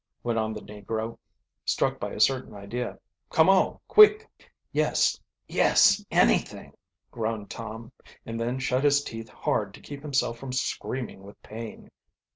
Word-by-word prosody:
went 120 -1 0
on 110 0 -1
the 105 -1 -6
negro, 110 +2 -5 0.4
struck - - 0
by - - -3
a - - -7
certain 130 -4 +2
idea. 115 +5 -5 0.3
"Come 160 +3 +4
on, 195 -1 +4
quick!" 425 +1 +7 0.4
"Yes - - +1 0.3
yes 210 -1 +4
anything!" - - +1 0.4
groaned 110 -3 -3
Tom, 115 +1 -7 0.3
and 115 0 -5
then 120 +2 -1
shut 130 0 0
his 145 0 +4
teeth 115 -3 -7
hard 100 -2 -2
to - - -14
keep 145 -1 -9
himself 135 -5 -1
from 130 -1 -6
screaming 130 -4 -3
with 100 +1 -14
pain. 110 +1 -9
115 Hz, 145 wpm, -27 LUFS, 110-135 Hz, 0.4 s, quick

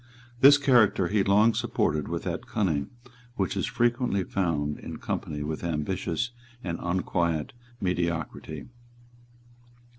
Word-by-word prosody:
This 140 +2 +9
character 120 -10 +4
he 105 -1 +2
long 105 +4 +4
supported 75 -7 0
with - - -3
that - - -4
cunning 80 -9 0 0.5
which 95 -6 -1
is - - -1
frequently 120 -4 +1
found 80 -6 -1
in - - -7
company 75 -1 -3
with 80 +2 -4
ambitious 85 +7 -2 0.3
and 85 -2 -3
unquiet 85 -3 -1 0.3
mediocrity. 85 -4 -2
90 Hz, 115 wpm, -27 LUFS, 80-105 Hz, 0.5 s, This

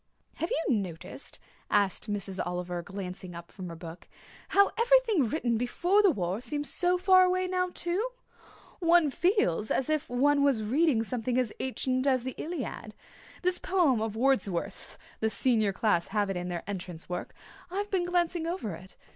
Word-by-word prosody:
"Have 330 - -2
you 305 -4 +1
noticed," 175 -5 -3 0.3
asked 205 +1 +1
Miss 195 -2 -3
Oliver, 180 0 -3
glancing 185 -1 -7
up 170 0 -10
from 185 -3 -7
her 165 - -7
book, 165 +1 -10 0.4
"how 400 0 +5
everything 465 - +3
written 240 -4 0
before 345 - +2
the 405 - +5
war 195 - -1
seems 290 +4 -2
so 360 0 +2
far 370 0 +6
away 370 0 +2
now, 365 0 0
too? 350 +5 -1 0.8
One 340 -4 +4
feels 265 - +1
as 265 +3 0
if 310 -2 -1
one 285 +4 +3
was 265 -6 +2
reading 260 +1 +2
something 245 +1 -2
as 250 -4 0
ancient 255 0 -1
as 260 -3 +2
the 260 0 -4
Iliad. 335 +2 -5 0.5
This 365 0 +1
poem 335 - +2
of 220 -1 -2
Wordsworth's 230 -8 -1 0.2
the 220 - +1
Senior 220 -3 +3
class 190 -4 +1
have 205 -1 0
it - - -3
in 180 0 -3
their 175 -2 -4
entrance 180 -4 -6
work 180 0 -5 0.3
I've 405 +3 -3
been 370 -3 +1
glancing 350 -1 0
over 335 - -3
it. 185 +3 -11
250 Hz, 170 wpm, -29 LUFS, -, 0.8 s, far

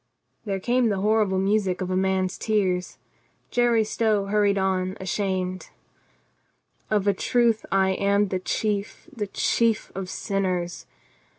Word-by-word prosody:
..." - - -46
There 195 -2 -2
came 240 +3 +2
the 195 -2 -1
horrible 210 -2 +2
music 195 -1 +1
of 185 -1 -3
a - - 0
man's 190 0 0
tears. 190 -5 0 0.5
Jerry 240 -2 +3
Stow 215 -2 0
hurried 200 0 +2
on, 190 -1 0
ashamed.... 185 -1 -2 1.2
"Of 210 -2 +1
a 200 - +4
truth 230 +2 +1
I 190 0 +3
am 200 +1 +1
the 185 - -1
chief, 205 - -2
the 210 -3 -3
chief 225 +2 0
of 190 -1 -5
sinners. 185 -4 -2
195 Hz, 135 wpm, -25 LUFS, 190-215 Hz, 1.2 s, a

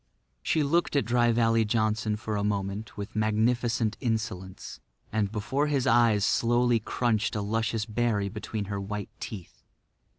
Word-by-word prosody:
She 155 - +1
looked 165 +3 +1
at 140 - +2
Dry 120 0 +3
Valley 115 -1 +3
Johnson 110 0 0
for 110 0 -4
a 100 - -1
moment 100 +1 -3
with 100 +1 -6
magnificent 110 +1 +1
insolence, 110 -6 -4 0.3
and 105 -2 0
before 130 +7 -1
his 140 -3 +1
eyes 115 -6 +4
slowly 120 0 +3
crunched 110 -1 0
a 105 - -1
luscious 110 +1 -1
berry 110 -2 0
between 105 +1 -4
her 100 0 -4
white 105 +1 -5
teeth. 95 -6 -8
110 Hz, 145 wpm, -28 LUFS, 105-120 Hz, 0.3 s, eyes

